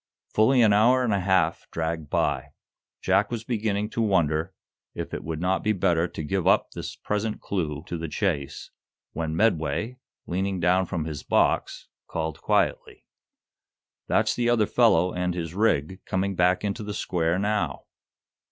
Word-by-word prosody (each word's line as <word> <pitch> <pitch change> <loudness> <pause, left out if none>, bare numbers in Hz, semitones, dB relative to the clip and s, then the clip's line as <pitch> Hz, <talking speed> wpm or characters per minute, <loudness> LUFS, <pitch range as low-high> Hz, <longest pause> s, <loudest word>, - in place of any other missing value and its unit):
Fully 120 +3 +4
an 105 -2 +5
hour 125 +5 +4
and 115 -4 +1
a 100 - +1
half 90 -3 +1
dragged 80 -2 -3
by. - - -1 0.5
Jack - - +2
was 115 -2 -4
beginning 105 -3 -1
to 115 - -1
wonder 85 -7 +1 0.4
if - - -5
it - - -4
would 80 0 -4
not 95 +2 0
be 110 - +1
better 85 -3 +1
to 80 - -7
give 95 +3 -1
up - - +3
this - - -6
present 105 +1 -2
clue 80 -6 -3
to 85 -2 -5
the 85 - -4
chase, 75 -4 -2 0.4
when 80 0 -3
Medway, 110 +5 0 0.3
leaning 95 +1 -2
down 90 +2 +2
from 85 -4 -3
his 75 -3 -5
box, - - 0 0.2
called 80 -1 -4
quietly. - - 0 1.0
"That's - - +2
the 120 0 0
other 115 -3 +3
fellow 90 -7 +3
and 90 0 -1
his 85 -2 -4
rig, 95 -3 0
coming 95 +1 -1
back 90 +2 +2
into 105 +2 -2
the 105 -1 -5
square 85 -1 0
now." 100 -8 -1
95 Hz, 160 wpm, -25 LUFS, 80-105 Hz, 1.0 s, an